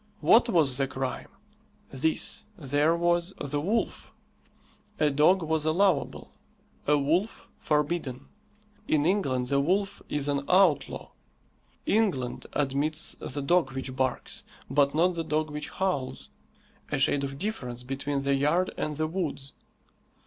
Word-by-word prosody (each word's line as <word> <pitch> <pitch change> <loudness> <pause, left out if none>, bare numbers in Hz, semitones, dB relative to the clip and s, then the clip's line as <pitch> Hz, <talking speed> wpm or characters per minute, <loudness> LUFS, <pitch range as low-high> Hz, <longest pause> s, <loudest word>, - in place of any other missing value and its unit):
What 235 +1 +5
was 155 - +3
the 135 - +2
crime? 130 0 -4 0.6
This: 155 +4 -1
there 145 +1 +2
was 175 +2 +1
the 145 +1 -2
wolf. 215 +8 -1 0.9
A 150 -1 +3
dog 160 +6 +4
was 160 -1 0
allowable; 160 -1 +1 0.6
a 150 0 +5
wolf 165 +10 0
forbidden. 150 -3 -1 0.6
In 150 -1 +2
England 135 -10 +1
the 140 - +2
wolf 195 +7 0
is 145 -1 -1
an 140 -1 0
outlaw. 185 -5 +3 0.7
England 185 - 0
admits 145 +3 0
the 145 - -4
dog 150 -2 +2
which 130 -1 -4
barks, 130 -2 -2 0.3
but 140 +1 +3
not 180 +3 +3
the 165 -1 -3
dog 155 -1 -1
which 150 0 -5
howls 180 -9 -3 0.6
a - - +1
shade 140 - +2
of 135 0 -4
difference 125 - -4
between 135 +2 -3
the 140 0 +2
yard 150 +7 +2
and 150 -1 -2
the 155 - +1
woods. 155 -5 -4
150 Hz, 135 wpm, -28 LUFS, 140-175 Hz, 0.9 s, What